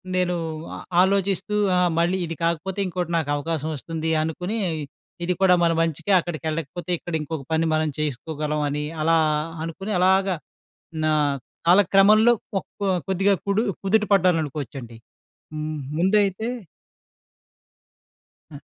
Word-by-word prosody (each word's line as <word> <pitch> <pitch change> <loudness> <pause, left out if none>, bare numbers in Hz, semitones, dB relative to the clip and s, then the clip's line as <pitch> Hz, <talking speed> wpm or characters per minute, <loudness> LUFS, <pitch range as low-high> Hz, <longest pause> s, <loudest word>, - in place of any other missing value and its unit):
నేను 180 -1 +1 0.4
ఆ - - -7 0.2
ఆలోచిస్తూ 195 +1 +1 0.2
ఆహ్, 180 -1 +3
మళ్ళీ 175 +3 +2
ఇది 165 0 -5
కాకపోతే 170 +4 -1
ఇంకోటి 180 -1 -3
నాకు 160 -3 -2
అవకాశం 155 +1 -2
వస్తుంది 160 +3 -4
అనుకుని 180 +7 -3 0.7
ఇది 180 - +1
కూడా 190 -1 +6
మన 170 - +4
మంచికే 165 +4 -1
అక్కడికెళ్లకపోతే 165 +1 -4
ఇక్కడ 175 - -8
ఇంకొక 150 -1 -5
పని 160 +1 +2
మనం 155 0 +1
చేసుకోగలం 150 +1 -2
అని 150 +1 -2 0.2
అలా 165 +2 +3 0.5
అనుకుని 180 +6 -5
అలాగా 190 +1 +3 0.7
నా 155 - +3 0.6
కాలక్రమంలో 205 +5 +6 0.3
ఒక - - -8 0.4
కొద్దిగా 195 +1 +3
కుడు 200 +2 +2 0.2
కుదుట 210 +2 +2
పడ్డాననుకోవచ్చండి. 150 - 0 0.6
హ్మ్. 155 0 -4 0.2
ముందైతే 200 +3 +2 2.0
ఆ! 145 - -8
170 Hz, 115 wpm, -23 LUFS, 155-190 Hz, 2.0 s, కూడా